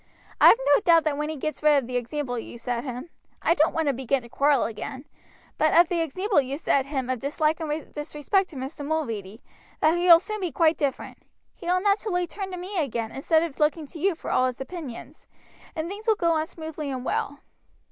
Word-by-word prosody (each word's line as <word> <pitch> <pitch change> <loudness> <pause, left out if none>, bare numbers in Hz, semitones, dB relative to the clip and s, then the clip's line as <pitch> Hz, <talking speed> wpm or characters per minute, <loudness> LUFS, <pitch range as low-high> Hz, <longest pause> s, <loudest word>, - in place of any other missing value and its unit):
"I - - +8
have - - +8 0.2
no - - +4
doubt 335 -3 +5
that 305 -2 0
when 300 +1 -2
he 315 - -3
gets 310 +2 -4
rid 300 -1 +5
of 270 - 0
the 250 +1 -6
example 245 0 -2
you 235 - -9
set 235 0 -3
him 260 +4 -7 0.3
I - - +4
don't 315 -1 +3
want 325 -1 -1
to 280 - +2
begin 260 +1 -1
to 235 - -13
quarrel 280 0 +2
again 260 +5 -6 0.5
but 310 0 +3
of 345 0 +6
the 345 -2 0
example 370 +3 +1
you 270 +1 -4
set 275 -3 +1
him 270 -3 -3
of 255 -1 -2
dislike 305 +4 0
and 310 -1 -4
disrespect 300 +6 -1
to 315 - -12
Mr. 270 +3 -6
Mulready, 230 -9 -3 0.4
that 315 +2 +3
he 355 - 0
will 335 -1 +10
soon 430 +4 -5
be 360 -3 -2
quite 320 +3 +2
different. 280 -3 -3 0.3
He - - -11
will 365 +1 +2
naturally 400 -3 +1
turn 385 +3 -6
to 365 - -6
me 370 +2 -4
again 235 -6 -2
instead 315 +4 +2
of 325 -5 -6
looking 305 +1 +1
to 320 +3 -11
you 380 +2 +1
for - - -6
all 255 - +3
his 255 - -5
opinions, 285 -2 -8 0.5
and 315 0 -3
things 410 +5 -8
will 445 - +5
go 340 -4 +1
on 315 0 0
smoothly 315 -3 -6
and 260 -2 -4
well." 285 0 -2
305 Hz, 230 wpm, -25 LUFS, 265-335 Hz, 0.5 s, will